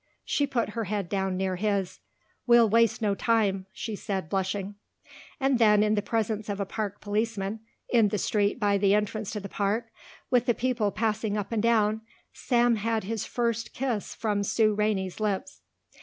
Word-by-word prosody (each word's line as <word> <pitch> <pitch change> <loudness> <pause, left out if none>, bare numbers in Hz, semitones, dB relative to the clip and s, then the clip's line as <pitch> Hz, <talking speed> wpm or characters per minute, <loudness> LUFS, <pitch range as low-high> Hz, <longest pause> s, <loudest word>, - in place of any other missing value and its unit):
She 285 - +1
put 245 -5 -1
her 225 +1 -3
head 200 -2 -3
down 190 -2 -1
near 190 -1 -1
his. 200 -2 -1 0.5
"We'll 235 -1 +7
waste 230 +1 +3
no 205 -2 +2
time," 200 -3 +1
she 220 +2 -5
said, 190 -5 -4
blushing. 195 +1 -2 0.7
And 270 -2 +2
then 210 -2 +5
in 215 0 +2
the 210 - +1
presence 215 -1 -2
of 200 0 -3
a 200 - -1
park 205 0 -4
policeman, 210 0 -2 0.3
in 230 -4 +4
the 210 - -1
street 205 +3 0
by 205 -2 +2
the 200 0 +4
entrance 210 0 -1
to 210 - -3
the 200 - -7
park 215 +4 -1 0.4
with 245 0 +3
the 240 - +3
people 245 -4 0
passing 215 0 -1
up 205 +1 -4
and 225 -2 0
down, 220 -1 +2 0.3
Sam 240 -2 +2
had 220 +1 -1
his 220 +2 -3
first 230 -2 -2
kiss 245 -6 -2
from 210 -2 -1
Sue 215 +1 +2
Rainey's 205 -3 -1
lips. 205 -3 -2
210 Hz, 180 wpm, -27 LUFS, 200-230 Hz, 0.7 s, We'll